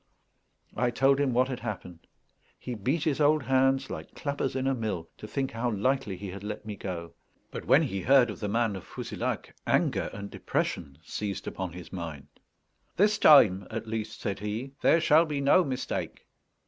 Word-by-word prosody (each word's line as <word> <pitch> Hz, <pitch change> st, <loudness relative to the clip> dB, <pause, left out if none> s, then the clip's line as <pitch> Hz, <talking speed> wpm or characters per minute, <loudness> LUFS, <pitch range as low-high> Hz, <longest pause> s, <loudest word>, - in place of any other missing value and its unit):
I 125 Hz, -, +1 dB
told 135 Hz, +3 st, +3 dB
him 140 Hz, -2 st, +2 dB
what 125 Hz, +2 st, +3 dB
had 130 Hz, -2 st, -4 dB
happened. 95 Hz, -7 st, -7 dB, 0.5 s
He 125 Hz, -, -6 dB
beat 130 Hz, +9 st, -1 dB
his 155 Hz, -2 st, 0 dB
old 150 Hz, 0 st, +4 dB
hands 135 Hz, +1 st, +2 dB
like -, -, -7 dB
clappers 140 Hz, -3 st, -2 dB
in 130 Hz, 0 st, -1 dB
a 135 Hz, -, +2 dB
mill, 105 Hz, -9 st, -3 dB
to 110 Hz, -, -8 dB
think 135 Hz, +3 st, -2 dB
how 115 Hz, +2 st, -1 dB
lightly 110 Hz, -1 st, 0 dB
he 100 Hz, +1 st, -6 dB
had 100 Hz, +1 st, -8 dB
let 105 Hz, +1 st, -5 dB
me 105 Hz, -1 st, -5 dB
go; 85 Hz, -4 st, -6 dB, 0.4 s
but -, -, -6 dB
when -, -, +5 dB
he 95 Hz, 0 st, -2 dB
heard 125 Hz, 0 st, +5 dB
of -, -, -9 dB
the 105 Hz, -, -2 dB
man 115 Hz, 0 st, +1 dB
of 95 Hz, -, -7 dB
Fouzilhac, -, -, -4 dB
anger -, -, +1 dB
and 100 Hz, 0 st, -7 dB
depression 70 Hz, -5 st, -2 dB
seized 100 Hz, -2 st, -4 dB
upon 90 Hz, -3 st, -4 dB
his 85 Hz, -1 st, -10 dB
mind. 80 Hz, -6 st, -6 dB, 0.7 s
"This 210 Hz, +2 st, +3 dB
time, 100 Hz, -11 st, +7 dB
at 115 Hz, 0 st, -4 dB
least," 110 Hz, -1 st, -4 dB
said 100 Hz, 0 st, -2 dB
he, 110 Hz, +6 st, -4 dB
"there 165 Hz, -, +5 dB
shall 160 Hz, 0 st, +5 dB
be 150 Hz, -2 st, -2 dB
no 140 Hz, +6 st, +5 dB
mistake." 130 Hz, -5 st, -4 dB
115 Hz, 185 wpm, -28 LUFS, 100-135 Hz, 0.7 s, time